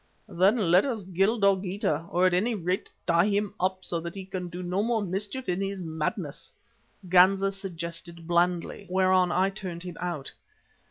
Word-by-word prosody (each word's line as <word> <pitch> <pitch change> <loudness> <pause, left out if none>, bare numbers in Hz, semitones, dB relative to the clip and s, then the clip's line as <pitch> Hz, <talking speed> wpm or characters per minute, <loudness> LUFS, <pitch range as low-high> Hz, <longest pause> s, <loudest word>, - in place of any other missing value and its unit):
"Then 195 0 +2
let 180 +2 +6
us 230 -8 -3
kill 205 +6 +3
Dogeetah, 190 -5 +1
or 180 +2 +2
at 185 - +4
any 220 +6 +1
rate 185 0 -2 0.2
tie 170 +2 +4
him 205 -1 0
up, 185 0 -1
so 170 - -2
that 170 +2 -6
he 190 -1 -6
can 185 -2 -5
do 180 +1 -6
no 180 +3 0
more 225 -1 0
mischief 205 +7 -3
in 180 +1 0
his 195 0 -3
madness," 160 -1 -4 0.6
Ganza 190 +2 +5
suggested 170 -3 -6
blandly, 175 +3 0
whereon 185 -1 +3
I 190 +2 +2
turned 185 -4 -6
him 180 -2 -7
out. 170 -6 -3
185 Hz, 170 wpm, -27 LUFS, 175-195 Hz, 0.6 s, let